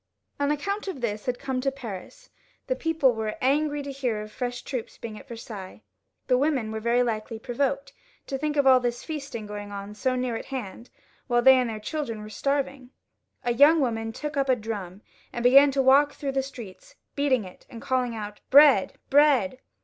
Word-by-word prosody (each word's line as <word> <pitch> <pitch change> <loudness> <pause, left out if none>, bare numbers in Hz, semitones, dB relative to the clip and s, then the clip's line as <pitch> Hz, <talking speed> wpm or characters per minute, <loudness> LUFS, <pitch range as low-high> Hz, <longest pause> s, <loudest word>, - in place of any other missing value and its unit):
An 285 0 +1
account 395 +8 -2
of 375 -8 -4
this 215 -2 -3
had 250 -1 0
come 265 -1 -3
to 275 +1 0
Paris. 265 - -9 0.4
The - - -1
people 320 - +2
were 220 -1 -3
angry 290 +2 +1
to 280 - -5
hear 255 -5 -2
of 215 - -11
fresh 245 0 -4
troops 250 -5 -5
being 225 -2 -7
at - - -15
Versailles. 220 -4 -9 0.4
The 250 -1 +3
women 270 -7 0
were 220 - -3
very 235 +2 +2
likely 225 -1 -3
provoked 275 +5 -2 0.3
to 275 - -4
think 300 +2 -2
of 285 - +3
all 260 -1 +7
this 240 -1 -3
feasting 280 -8 -6
going 205 0 -7
on 200 +1 -7
so 255 +5 -1
near 250 -2 -1
at - - -5
hand, 240 -3 -7 0.4
whHe 240 0 +3
they 265 +1 +8
and 250 -2 +1
their 220 -1 -5
chUdren 230 -3 -4
were 215 - -9
starving. 275 0 -2 0.5
A 240 - +1
young 295 +6 +6
woman 225 -4 -1
took 300 +6 -5
up 275 -1 0
a 255 - +5
drum 205 -4 -6 0.3
and 240 - -4
began 275 +3 +7
to 270 0 +1
walk 280 +2 +5
through 280 -2 -4
the 270 0 0
streets, 265 - -11 0.2
beating 275 -5 +2
it 180 - -14
and 230 - -9
calling 250 -1 -1
out, 210 -1 -7
" - - -50
Bread! 280 -7 +7 0.2
bread 270 -6 +4
255 Hz, 205 wpm, -26 LUFS, 225-280 Hz, 0.5 s, they